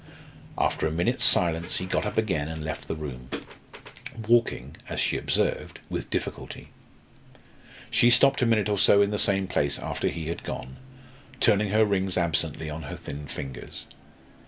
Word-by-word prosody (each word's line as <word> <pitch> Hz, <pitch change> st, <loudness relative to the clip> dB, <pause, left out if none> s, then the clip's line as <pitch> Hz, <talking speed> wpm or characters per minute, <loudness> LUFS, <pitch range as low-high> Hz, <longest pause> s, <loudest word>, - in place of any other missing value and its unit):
After -, -, +1 dB
a -, -, -2 dB
minute's 85 Hz, +2 st, +1 dB
silence, 85 Hz, 0 st, +3 dB
he 90 Hz, -, -2 dB
got 95 Hz, -, -1 dB
up -, -, -5 dB
again 95 Hz, -10 st, 0 dB
and 80 Hz, -1 st, -5 dB
left 80 Hz, -, -5 dB
the -, -, -3 dB
room, 65 Hz, -5 st, -7 dB, 1.0 s
walking, 115 Hz, -, +2 dB
as -, -, -3 dB
she -, -, +1 dB
observed, -, -, -1 dB
with -, -, -4 dB
difficulty. -, -, -5 dB, 1.2 s
She 120 Hz, -, +5 dB
stopped 135 Hz, +3 st, +5 dB
a 120 Hz, -, +3 dB
minute 110 Hz, -3 st, +2 dB
or 105 Hz, -2 st, 0 dB
so 100 Hz, +1 st, +6 dB
in 100 Hz, -, -1 dB
the 105 Hz, -, -1 dB
same 95 Hz, -1 st, +3 dB
place 70 Hz, -6 st, 0 dB
after -, -, -3 dB
he 80 Hz, -1 st, -3 dB
had 85 Hz, -, -4 dB
gone, 65 Hz, +1 st, -6 dB, 0.6 s
turning 105 Hz, -2 st, +3 dB
her 110 Hz, +2 st, +4 dB
rings 95 Hz, -2 st, 0 dB
absently 80 Hz, -2 st, +1 dB
on 75 Hz, +1 st, -5 dB
her 75 Hz, -, -6 dB
thin 70 Hz, 0 st, -7 dB
fingers. 65 Hz, -1 st, -7 dB
85 Hz, 165 wpm, -26 LUFS, 75-105 Hz, 1.2 s, so